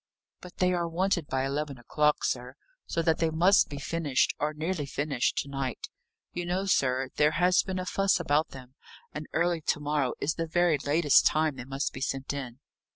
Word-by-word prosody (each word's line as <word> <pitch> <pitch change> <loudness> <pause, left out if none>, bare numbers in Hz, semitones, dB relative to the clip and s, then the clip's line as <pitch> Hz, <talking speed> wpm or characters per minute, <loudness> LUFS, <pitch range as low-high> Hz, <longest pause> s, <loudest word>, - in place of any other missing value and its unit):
"But 180 -1 -13
they 180 0 +2
are 170 -1 0
wanted 175 -2 0
by 130 0 -1
eleven 140 0 -3
o'clock, 150 +5 +1
sir, 125 +1 -2 0.3
so 165 - -1
that 160 -1 +2
they 165 -1 +2
must 175 +6 +4
be 145 - -6
finished, 145 -2 0
or 150 +1 0
nearly 155 0 -3
finished, 140 -3 -1
to - - -15
night. 135 -3 -4 0.4
You 175 - -4
know, 185 +2 -1
sir, 130 -7 +1
there 150 +1 +4
has 180 +1 +4
been 190 -1 -4
a 185 - -3
fuss 195 0 +1
about 155 -1 +1
them, 130 -1 -12 0.4
and 150 0 -6
early 170 0 +1
to 150 - 0
morrow, 145 -3 -1
is 155 - 0
the 165 0 -3
very 170 -2 +2
latest 145 +1 +4
time 155 -2 +1
they 125 -1 -8
must 135 +2 -3
be - - -8
sent 135 +1 -2
in." 130 -4 -6
150 Hz, 200 wpm, -28 LUFS, 135-170 Hz, 0.4 s, must